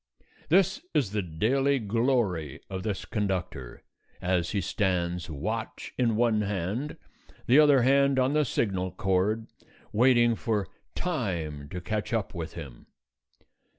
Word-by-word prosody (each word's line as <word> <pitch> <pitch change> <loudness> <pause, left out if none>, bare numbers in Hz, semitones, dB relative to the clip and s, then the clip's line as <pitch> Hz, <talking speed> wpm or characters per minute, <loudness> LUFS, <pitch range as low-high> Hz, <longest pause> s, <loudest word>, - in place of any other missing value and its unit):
This 185 +2 +3
is 135 -10 +2
the 105 0 0
daily 125 - +1
glory 110 - 0
of 95 -1 -3
this 105 -1 -3
conductor, 90 - -3 0.4
as 90 -1 0
he 100 - 0
stands, 90 -2 -1
watch 110 +10 -4
in 115 -3 +1
one 115 -2 +2
hand, 105 - -2 0.5
the 130 +5 +6
other 145 -4 +6
hand 140 +1 +4
on 130 +2 +2
the 150 0 +3
signal 95 -7 -1
cord, 100 +3 +1 0.5
waiting 120 0 +5
for 110 -4 -1 0.3
Time 85 - -3
to 90 - -5
catch 105 +4 -3
up 110 -3 -1
with 80 -3 -5
him. 70 -8 -9
105 Hz, 130 wpm, -28 LUFS, 90-125 Hz, 0.5 s, the